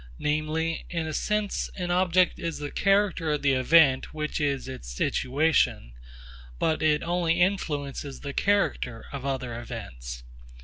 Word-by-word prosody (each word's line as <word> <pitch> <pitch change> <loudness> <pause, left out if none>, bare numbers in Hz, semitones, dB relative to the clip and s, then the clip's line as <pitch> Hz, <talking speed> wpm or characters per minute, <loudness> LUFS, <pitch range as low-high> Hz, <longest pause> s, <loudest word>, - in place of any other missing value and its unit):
Namely, 155 +2 -1
in 165 -2 -2
a 155 - -4
sense 210 +2 -1
an 180 -2 -3
object 180 0 +3
is 165 -1 -3
the 145 -1 -5
character 195 -5 +2
of 150 - -2
the 140 -1 +4
event 135 +1 +4
which 150 0 -2
is 140 -3 0
its 130 - -7
situation, 130 - +1 0.6
but 160 - 0
it 150 -1 +2
only 170 -1 +1
influences 145 -7 -1
the 140 -1 -5
character 195 - 0
of 140 -1 -5
other 130 -4 -3
events. 60 - -7
150 Hz, 140 wpm, -27 LUFS, 130-170 Hz, 0.6 s, the